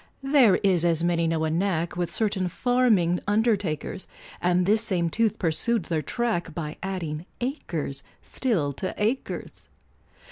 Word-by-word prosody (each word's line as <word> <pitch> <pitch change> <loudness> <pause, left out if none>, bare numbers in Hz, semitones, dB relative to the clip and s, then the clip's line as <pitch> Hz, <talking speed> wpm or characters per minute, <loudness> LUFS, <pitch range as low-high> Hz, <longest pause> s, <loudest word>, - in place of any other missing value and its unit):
There 270 -8 +5
is, 185 -4 +3
as 170 -1 +2
many 170 -1 +2
know, 165 -1 0
a 160 - 0
knack, 170 -1 0
With 175 -1 -1
certain 200 -4 0
farming 215 -5 +2
undertakers, 205 -6 0 0.3
And 180 0 +2
this 215 +3 +3
same 175 -6 0
tooth 225 +1 +1
pursued 185 +6 +1
their 160 -1 -1
track, 175 - -2
By 155 -2 -4
adding 175 -4 -4
achers 170 - -3 0.2
still 175 - -1
to 185 - -3
achers! 225 +6 -2
180 Hz, 140 wpm, -26 LUFS, 165-220 Hz, 0.3 s, There